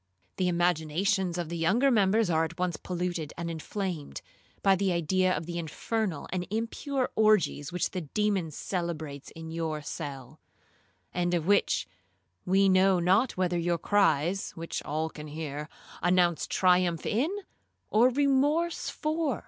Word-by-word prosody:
The 185 - +1
imaginations 175 +2 +1
of 170 -3 -3
the 170 - -3
younger 225 +12 +3
members 215 -1 +3
are 160 0 +3
at 160 - -5
once 180 -2 -1
polluted 175 -4 -3
and 170 0 -3
inflamed, 165 -1 -5 0.4
by 195 -1 +5
the 190 0 +1
idea 185 +2 +2
of 160 -2 -2
the 170 +1 -4
infernal 175 +2 -3
and 180 -1 -2
impure 245 +5 -2
orgies 205 -10 +3
which 180 - -1
the 185 - -3
demon 195 +2 0
celebrates 155 -4 -4
in 160 0 -8
your 160 -2 -3
cell; 135 -3 -7 0.7
and 175 0 +1
of 165 -2 -1
which 200 +2 +2 0.6
we 195 +2 +4
know 190 0 +4
not 195 +8 +2
whether 180 -1 +1
your 170 0 +1
cries, 185 -1 +2
(which 165 0 -4
all 155 +2 -2
can 155 -1 -9
hear), 150 0 -5 0.3
announce 175 -2 +2
triumph 180 -3 +2
in, 250 +9 +1 0.6
or 230 +4 +5
remorse 285 +5 +1
for. 305 - -1
180 Hz, 145 wpm, -29 LUFS, 160-205 Hz, 0.7 s, by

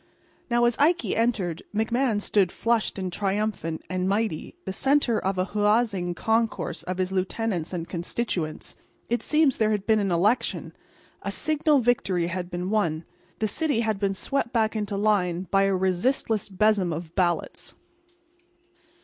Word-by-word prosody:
Now, 240 0 +3
as 240 -1 +2
Ikey 335 +5 +2
entered, 215 -8 0
McMahan 225 +1 +1
stood, 200 -3 +1
flushed 230 -3 0
and 185 -2 -3
triumphant 195 -5 -2
and 185 +1 -1
mighty, 200 -6 -1
the 190 - -3
centre 270 -1 +2
of 190 0 -2
a 185 - +1
huzzaing 210 -4 +1
concourse 225 +2 0
of 185 0 -4
his 185 0 -1
lieutenants 190 -2 -1
and 170 -2 -4
constituents. 175 -2 -3 0.4
It 240 - +1
seems 305 -4 +3
there 215 -1 +2
had 205 -2 -1
been 220 0 +3
an 200 -2 0
election; 200 +8 +1 0.5
a - - -4
signal 300 -2 +2
victory 195 -7 +1
had 175 0 -4
been 180 +1 -3
won; 170 -7 0 0.3
the 220 - 0
city 285 +2 0
had 220 -3 -1
been 195 -1 0
swept 275 +3 -1
back 220 -2 +1
into 210 -2 -2
line 190 -4 +1
by 195 0 +4
a 195 -1 +2
resistless 200 +4 0
besom 195 -2 +2
of 165 +1 -5
ballots. 175 -3 -1
205 Hz, 155 wpm, -25 LUFS, 185-230 Hz, 0.5 s, by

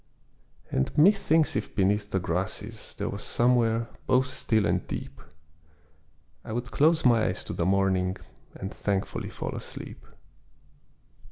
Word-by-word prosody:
And 65 - -1
methinks 165 -2 +4
if 105 - -3
beneath 105 +1 +1
the 95 - 0
grasses, 90 +1 -4
There - - -3
was - - -5
somewhere, 115 -1 +2 0.2
both 130 0 +4
still 110 -4 0
and - - 0
deep, 70 - -6 1.2
I 110 - -6
would 120 +1 -3
close 160 +1 +3
my 115 -3 +5
eyes 90 - -3
to - - -6
the 85 - 0
morning, 95 -1 +2 0.4
And 95 +2 -6
thankfully 100 -2 -2
fall - - -5
asleep. - - -7
110 Hz, 135 wpm, -27 LUFS, 95-125 Hz, 1.2 s, my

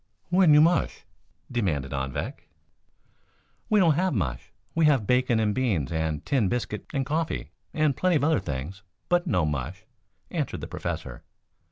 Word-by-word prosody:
"When 180 -3 +5
you 150 - +8
mush?" 170 +2 +2 0.5
demanded 80 - -1
Anvik. 65 -1 -4 1.2
"We 215 - +4
don't 170 -5 +5
have 180 0 +1
mush. 65 - -3 0.2
We 165 -1 +3
have 135 -8 +4
bacon 125 0 +2
and 105 -1 +1
beans, 100 - 0
and 80 -2 -2
tin 120 -9 +2
biscuit 115 -2 -3
and 135 -2 -1
coffee, 155 +3 -2 0.2
and 155 -3 +1
plenty 185 -2 +2
of 145 - +2
other 160 0 +3
things, 75 +8 -5 0.3
but 175 0 +2
no 90 -3 +2
mush," 75 +6 -3 0.5
answered - - -2
the - - -5
Professor. - - -5
120 Hz, 155 wpm, -26 LUFS, -, 1.2 s, you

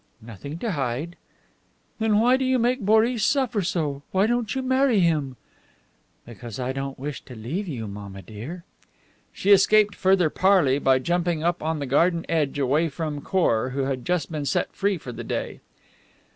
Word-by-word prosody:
"Nothing 120 - -8
to 225 +5 -3
hide." 140 +3 -3 0.8
"Then 220 -1 +2
why 245 +3 +4
do 265 - -1
you 260 0 +2
make 245 +2 +1
Boris 220 +3 +3
suffer 260 -7 +1
so? 155 -6 -2
Why 190 +2 +2
don't 240 +1 -1
you 265 - -2
marry 260 -3 +3
him?" 150 -6 +1 0.9
"Because 120 0 -9
I 125 0 -2
don't 135 0 -5
wish 145 +2 -5
to 125 - -11
leave 150 - -4
you, 125 -9 -5
mamma 100 -1 -8
dear." 125 +12 -8 0.7
She 200 - 0
escaped 205 +1 +5
further 185 -4 +2
parley 180 -8 +3
by 135 -2 +3
jumping 170 +3 -1
up 175 +1 0
on 160 +1 -1
the 145 - -3
garden 165 +6 +2
edge 150 -4 0
away 145 +4 +1
from 150 -1 -4
Khor, 130 -10 +1
who 140 - 0
had 135 -2 -2
just 175 0 -1
been 150 -2 -3
set 135 - -1
free 200 -1 0
for 135 -6 -8
the 120 0 -7
day. - - -4
165 Hz, 175 wpm, -24 LUFS, 135-200 Hz, 0.9 s, escaped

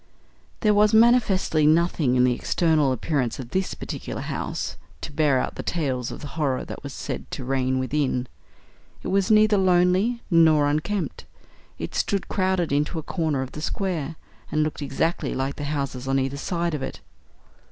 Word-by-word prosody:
There 210 -2 +4
was 210 +1 +4
manifestly 220 -9 +4
nothing 155 -5 +3
in 125 - +4
the 125 -1 +4
external 155 +1 +2
appearance 130 -1 -1
of 125 -2 -8
this 190 0 -1
particular - - -6
house - - -4 0.3
to - - -6
bear 145 -2 +2
out - - -2
the - - -3
tales 130 -7 -2
of - - -8
the 145 - -7
horror 140 -4 -1
that - - -8
was 140 - -7
said - - -6
to 130 - -6
reign 130 0 0
within. 130 -1 0 0.8
It - - -3
was 195 +2 +1
neither 215 -1 +5
lonely 185 +6 +3
nor 160 -3 +5
unkempt. 155 +7 -2 0.5
It - - -6
stood, 200 -3 -1
crowded 185 -4 0
into 145 +4 0
a 160 - -3
corner 155 -5 -1
of 130 - -8
the 150 - -7
square, 165 -3 -2 0.4
and 155 - +2
looked 155 0 -3
exactly 145 +4 -1
like 135 +1 -2
the 145 - -4
houses 140 -3 -3
on 135 0 +2
either 135 +1 -1
side 170 +2 -2
of 150 - -3
it. - - -5
155 Hz, 175 wpm, -24 LUFS, 135-185 Hz, 0.8 s, neither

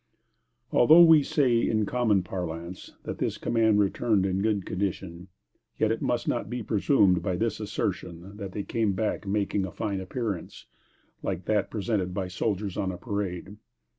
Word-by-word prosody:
Although 160 +8 +7
we 160 -2 +7
say, 130 -4 +2
in 110 -2 +1
common 110 -4 +1
parlance, 90 -1 -6
that - - -6
this - - -1
command 110 -2 +2
returned 105 0 +2
in 95 0 0
good 105 -3 0
condition, 90 -2 -4 0.5
yet - - +2
it - - -2
must - - -1
not - - -1
be 120 0 -4
presumed 100 -3 +3
by 95 -3 -1
this 110 +3 -1
assertion 95 -3 -4
that 100 -3 -6
they 100 - -3
came 110 0 0
back 105 0 -2
making 100 0 0
a 95 - -4
fine 100 -4 -3
appearance, 100 -2 -5 0.6
like 90 -2 -3
that 105 -2 +1
presented 95 -3 -2
by 95 -2 -2
soldiers 100 0 -2
on 95 -2 -1
a 90 - -7
parade. 100 -1 -4
100 Hz, 165 wpm, -27 LUFS, 95-110 Hz, 0.6 s, Although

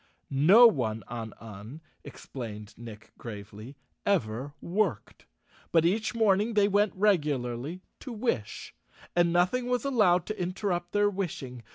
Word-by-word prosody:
No 175 - +7
one 115 - +2
on 115 -2 -6
Un, 110 +5 -10 0.2
explained 110 -4 -8
Nick 115 -3 -11
gravely, 110 +3 -9 0.3
ever 140 - -1
worked, 175 - -2 0.4
but 165 -1 +4
each 215 +6 0
morning 215 0 +2
they 205 -1 +4
went 205 -2 +1
reg¬ 200 -4 +4
ularly 135 +4 -3 0.2
to 260 - -8
wish, 210 - -3 0.4
and 175 -1 +3
nothing 185 +9 +1
was 250 -1 0
allowed 185 -10 +3
to 215 -3 -5
interrupt 180 -1 -2
their 205 0 +3
wishing. 155 -11 -4
175 Hz, 135 wpm, -28 LUFS, -, 0.4 s, No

